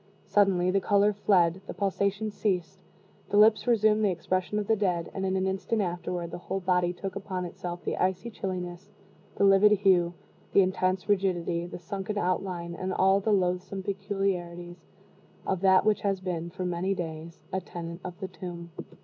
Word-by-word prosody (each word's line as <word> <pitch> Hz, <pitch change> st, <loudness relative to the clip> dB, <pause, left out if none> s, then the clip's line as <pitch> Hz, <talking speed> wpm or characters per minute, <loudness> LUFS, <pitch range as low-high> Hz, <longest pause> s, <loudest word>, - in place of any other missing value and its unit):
Suddenly, 185 Hz, -3 st, +3 dB
the 195 Hz, +1 st, +2 dB
color 205 Hz, +1 st, +3 dB
fled, 190 Hz, -3 st, +2 dB
the -, -, -6 dB
pulsation 200 Hz, +2 st, -1 dB
ceased, 185 Hz, -4 st, -2 dB, 0.5 s
the 205 Hz, -, +1 dB
lips 215 Hz, +3 st, +5 dB
resumed 215 Hz, -2 st, +4 dB
the 205 Hz, -, +4 dB
expression 185 Hz, +2 st, -1 dB
of 210 Hz, -, -1 dB
the 220 Hz, -, +3 dB
dead, 180 Hz, -5 st, -1 dB
and, 190 Hz, 0 st, -2 dB
in 190 Hz, -, 0 dB
an 190 Hz, 0 st, +1 dB
instant 190 Hz, +4 st, -1 dB
afterward, 175 Hz, -1 st, -3 dB
the -, -, -6 dB
whole 190 Hz, +2 st, -3 dB
body 180 Hz, -1 st, +1 dB
took 185 Hz, +2 st, -6 dB
upon 190 Hz, -2 st, -4 dB
itself 175 Hz, 0 st, -6 dB
the -, -, -1 dB
icy 190 Hz, +5 st, -1 dB
chilliness, 185 Hz, -2 st, -5 dB, 0.5 s
the -, -, +1 dB
livid 200 Hz, +2 st, +6 dB
hue, 180 Hz, -4 st, +3 dB, 0.4 s
the 200 Hz, -, +7 dB
intense 185 Hz, 0 st, 0 dB
rigidity, 175 Hz, -4 st, 0 dB
the -, -, -7 dB
sunken 195 Hz, +4 st, -5 dB
outline, 180 Hz, -2 st, -1 dB
and 185 Hz, +2 st, -3 dB
all 190 Hz, +1 st, +4 dB
the 215 Hz, +2 st, 0 dB
loathsome 185 Hz, 0 st, 0 dB
peculiarities 190 Hz, -3 st, -3 dB, 0.6 s
of 190 Hz, -2 st, -1 dB
that 190 Hz, -1 st, +5 dB
which 215 Hz, -1 st, +2 dB
has 195 Hz, -2 st, 0 dB
been, 175 Hz, -2 st, -3 dB
for 185 Hz, +1 st, -5 dB
many 180 Hz, +2 st, -1 dB
days, 165 Hz, -1 st, -6 dB
a 190 Hz, -, 0 dB
tenant 170 Hz, 0 st, -7 dB
of 180 Hz, -1 st, -7 dB
the 190 Hz, -, -4 dB
tomb. 170 Hz, -1 st, -8 dB
185 Hz, 175 wpm, -28 LUFS, 175-195 Hz, 0.6 s, the